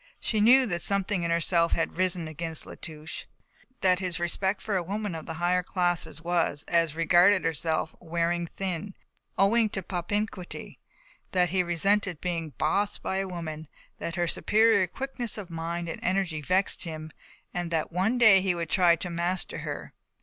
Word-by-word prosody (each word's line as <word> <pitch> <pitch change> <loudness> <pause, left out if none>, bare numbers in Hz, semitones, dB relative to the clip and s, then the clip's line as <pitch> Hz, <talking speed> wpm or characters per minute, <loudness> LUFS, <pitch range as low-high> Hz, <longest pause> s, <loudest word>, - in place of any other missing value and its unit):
She 215 -2 0
knew 255 +4 +7
that 175 -7 -2
something 200 -1 0
in 170 - -1
herself 170 0 +2
had 165 - -1
risen 180 -2 0
against 160 +1 -4
La - - -9
Touche. 155 -1 -7
She - - -10 0.3
felt 255 - -32
that 185 -1 +4
his 180 -3 -2
respect 190 +3 -1
for 210 - -3
a 185 - +2
woman 200 +2 -3
of 160 -1 -7
the 160 - -4
higher 175 +2 +2
classes 175 -4 -1
was, 170 -4 0
as 165 -3 +2
regarded 175 +3 +4
herself, 160 0 -1
wearing 170 0 -1
thin, 190 +2 -4 0.4
owing 220 +3 +4
to 195 -2 -4
propinquity. 185 +2 -4 0.5
That 180 -1 +3
he 185 +2 +2
resented 180 +1 +1
being 165 -4 -3
"bossed" 205 0 0
by 190 - -1
a 195 0 -1
woman, 160 -3 -6 0.3
that 170 - -4
her 175 -1 +1
superior 215 +1 +3
quickness 245 +2 -3
of 190 -4 -7
mind 170 +1 -3
and 165 - -5
energy 185 -5 0
vexed 185 +6 +1
him 155 -2 -6 0.4
and 175 -1 -2
that 165 0 -1
one 190 +8 +1
day 215 -6 +7
he 185 -2 +1
would 170 -1 -4
try 175 -3 +5
to 175 +2 -5
master 175 +2 -2
her. - - -6
175 Hz, 180 wpm, -27 LUFS, 165-195 Hz, 0.5 s, knew